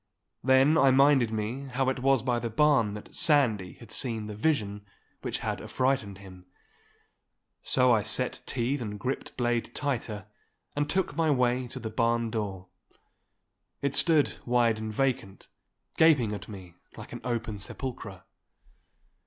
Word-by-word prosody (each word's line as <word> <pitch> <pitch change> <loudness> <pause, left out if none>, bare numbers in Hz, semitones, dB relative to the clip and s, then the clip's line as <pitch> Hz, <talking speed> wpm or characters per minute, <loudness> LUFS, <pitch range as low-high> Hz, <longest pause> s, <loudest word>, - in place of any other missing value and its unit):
Then 135 +4 +4
I 135 - +5
minded 135 -2 +4
me 110 +5 -4
how 130 +1 -1
it 130 - -2
was 135 -2 +2
by 125 -2 0
the 120 - -3
barn 115 -4 +2
that 105 - -11
Sandy 115 - +3
had 115 -2 -12
seen 110 -1 -1
the 105 - -6
vision 105 -5 -1 0.4
which - - -3
had - - -2
affrighted 130 -7 -1
him. 95 -2 -14 1.1
So 125 -1 +3
I 110 - +3
set 110 +4 0
teeth 130 +2 -1
and 105 -3 -5
gripped 130 +1 -4
blade 120 -1 -1
tighter, 115 -8 -3 0.5
and 145 0 -1
took 185 -6 0
my 160 0 +1
way 125 -2 +1
to - - -7
the 110 - -6
barn 115 0 0
door. 100 -4 -4 1.1
It 140 -1 0
stood 160 -4 +3
wide 120 -2 +2
and 110 0 -4
vacant, 115 -5 -2 0.5
gaping 145 -10 +4
at 105 0 -7
me 95 -5 -10 0.2
like - - -10
an - - -7
open 115 -4 -3
sepulchre. 100 -3 -6
120 Hz, 150 wpm, -28 LUFS, 105-135 Hz, 1.1 s, I